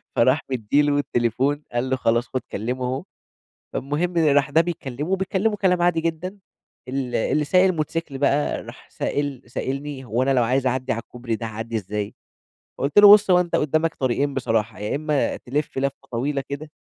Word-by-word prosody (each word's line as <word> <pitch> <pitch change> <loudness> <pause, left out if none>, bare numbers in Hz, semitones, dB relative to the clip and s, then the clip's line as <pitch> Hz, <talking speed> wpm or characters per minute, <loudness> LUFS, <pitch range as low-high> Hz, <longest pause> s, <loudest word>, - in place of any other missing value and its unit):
فراح 130 +6 +3
مدّي 130 +4 +2
له 145 -1 +2
التليفون، 135 +3 0
قال 120 +2 -1
له: 130 - +2
"خلاص 120 -1 +1
خُد 130 - -3
كلّمه 125 +5 -3
أهو." 130 +5 -2 0.7
فالمهم 155 +6 -1
راح 145 -3 +3
ده 160 - +4
بيكلّمه 155 -3 -3
وبيتكلّموا 195 +2 0
كلام 180 -3 +2
عادي 175 -2 +3
جدًا 170 +4 -3 0.5
ال 130 -1 -3
اللي 150 +6 +1
سايق 185 +5 +4
الموتوسيكل 160 -5 -1
بقى 145 +1 +1
راح - - -12
سائل 145 -3 -2
سائلني 135 +2 -4
"هو 120 +1 0
أنا 135 - +1
لو 125 - +4
عايز 130 +3 +1
أعدّي 130 0 0
على 115 - -2
الكوبري 120 -2 -5
ده 115 - -5
هاعدّي 115 +1 -5
إزاي؟" 105 0 -4 0.7
قُلت 140 +8 +2
له: 205 0 +10
"بُص، 210 -2 +6
هو 180 - +6
أنت 175 -1 0
قُدّامك 155 +2 +1
طريقين 135 +2 0
بصراحة، 115 -4 -1
يا 105 +6 -2
إمّا 150 -2 0
تِلِف 145 +2 -3
لفّة 140 0 -3
طويلة 140 +4 -1
كده" 145 +2 -6
140 Hz, 180 wpm, -23 LUFS, 125-155 Hz, 0.7 s, له